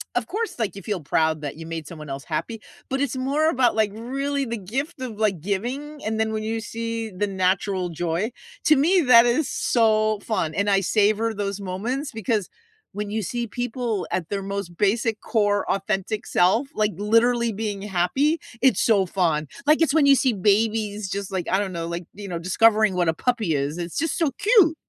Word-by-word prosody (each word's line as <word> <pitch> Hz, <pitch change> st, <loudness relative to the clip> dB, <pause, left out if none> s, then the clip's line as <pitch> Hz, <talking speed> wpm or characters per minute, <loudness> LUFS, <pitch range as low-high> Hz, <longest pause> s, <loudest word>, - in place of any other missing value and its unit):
of -, -, 0 dB
course, 440 Hz, -, -3 dB
like, 220 Hz, -4 st, -1 dB
you 200 Hz, -, -9 dB
feel 200 Hz, -4 st, -3 dB
proud 160 Hz, +1 st, +1 dB
that 145 Hz, -1 st, -5 dB
you 165 Hz, -, -8 dB
made 165 Hz, -2 st, -6 dB
someone 155 Hz, -3 st, -9 dB
else 135 Hz, 0 st, -5 dB
happy, 215 Hz, +9 st, -4 dB, 0.3 s
but 270 Hz, +1 st, -2 dB
it's 275 Hz, -2 st, -1 dB
more 285 Hz, +5 st, +1 dB
about, 255 Hz, -7 st, +2 dB
like, 220 Hz, -1 st, +2 dB
really 275 Hz, +4 st, -2 dB
the 235 Hz, 0 st, -3 dB
gift 265 Hz, -, -4 dB
of, 240 Hz, -5 st, -5 dB
like, 205 Hz, -6 st, 0 dB
giving. 250 Hz, -, -4 dB
And 220 Hz, 0 st, -1 dB
then 220 Hz, 0 st, +1 dB
when 215 Hz, 0 st, -2 dB
you 225 Hz, +1 st, -2 dB
see 230 Hz, 0 st, -4 dB
the 205 Hz, +1 st, -2 dB
natural 185 Hz, -1 st, 0 dB
joy 175 Hz, +6 st, -2 dB, 0.3 s
to 310 Hz, -, +6 dB
me, 340 Hz, +7 st, +4 dB
that 245 Hz, -5 st, +7 dB
is 255 Hz, +4 st, +1 dB
so 215 Hz, -2 st, +2 dB
fun. 165 Hz, -8 st, -1 dB
And 200 Hz, +3 st, 0 dB
I 195 Hz, -1 st, +3 dB
savor 215 Hz, +3 st, +2 dB
those 200 Hz, -1 st, -3 dB
moments 225 Hz, +10 st, -3 dB
because 220 Hz, -3 st, -1 dB, 0.4 s
when 205 Hz, 0 st, -4 dB
you 215 Hz, +1 st, -2 dB
see 240 Hz, +5 st, -3 dB
people 240 Hz, -2 st, -3 dB
at 170 Hz, -3 st, -2 dB
their 200 Hz, -1 st, -2 dB
most 195 Hz, -3 st, -5 dB
basic 220 Hz, +3 st, +1 dB
core 205 Hz, -2 st, +1 dB
authentic 195 Hz, +1 st, -2 dB
self, 205 Hz, +10 st, +3 dB
like, 215 Hz, 0 st, +1 dB
literally 230 Hz, +3 st, +2 dB
being 205 Hz, -1 st, -4 dB
happy, 205 Hz, -, +1 dB, 0.2 s
it's 265 Hz, 0 st, +4 dB
so 200 Hz, -5 st, +3 dB
fun. 165 Hz, -5 st, 0 dB, 0.2 s
Like, 305 Hz, +2 st, +4 dB
it's 320 Hz, -2 st, +3 dB
when 310 Hz, -3 st, +5 dB
you 280 Hz, -, +7 dB
see 260 Hz, -2 st, +2 dB
babies 210 Hz, 0 st, +1 dB
just, 200 Hz, 0 st, -4 dB
like, 185 Hz, -3 st, -3 dB
I 190 Hz, -, +3 dB
don't 195 Hz, -2 st, -2 dB
know, 165 Hz, -1 st, -3 dB
like, 170 Hz, +1 st, -5 dB
you 205 Hz, 0 st, -8 dB
know, 175 Hz, -3 st, -3 dB
discovering 215 Hz, +4 st, +3 dB
what 175 Hz, -2 st, +1 dB
a -, -, +2 dB
puppy 220 Hz, -7 st, 0 dB
is, 145 Hz, +4 st, -2 dB
it's 170 Hz, -1 st, -5 dB
just 325 Hz, 0 st, 0 dB
so 325 Hz, -4 st, +2 dB
cute. 405 Hz, -6 st, +5 dB
215 Hz, 205 wpm, -24 LUFS, 190-240 Hz, 0.4 s, that